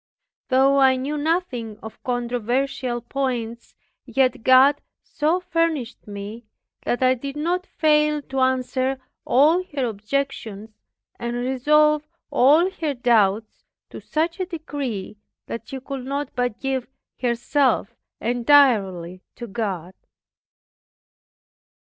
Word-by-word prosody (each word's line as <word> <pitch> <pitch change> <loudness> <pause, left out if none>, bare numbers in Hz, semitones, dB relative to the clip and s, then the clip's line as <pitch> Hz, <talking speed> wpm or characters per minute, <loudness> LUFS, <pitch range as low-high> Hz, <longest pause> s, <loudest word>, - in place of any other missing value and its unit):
Though 270 +1 +4
I 265 -1 +5
knew 270 +4 -3
nothing 290 - -2
of 220 - -10
controversial 245 +1 -1
points, 235 -2 -4 0.3
yet 255 -2 +1
God 260 +4 +6 0.2
so 320 +4 0
furnished 330 -11 -2
me 205 +3 -8 0.4
that 245 - 0
I 255 0 +5
did 275 +2 -6
not 355 +4 -1
fail 300 -1 +2
to 270 0 -4
answer 260 0 0 0.3
all 310 +8 +4
her 270 -3 +1
objections, 220 -1 -3 0.5
and 235 0 -3
resolve 300 +5 +2 0.2
all 295 +7 +5
her 310 -6 -3
doubts, 220 -3 +1 0.3
to - - -9
such 330 +3 -1
a 370 - -2
degree, 280 - -5 0.3
that 230 -1 -7
she 270 - -6
could 265 0 -6
not 280 +2 -3
but 245 -2 -2
give 265 -2 -2 0.3
herself 245 -1 +1
up - - -40 0.2
entirely 225 -9 +3
to 240 - -7
God. 195 -5 -4
260 Hz, 115 wpm, -23 LUFS, 235-290 Hz, 0.5 s, God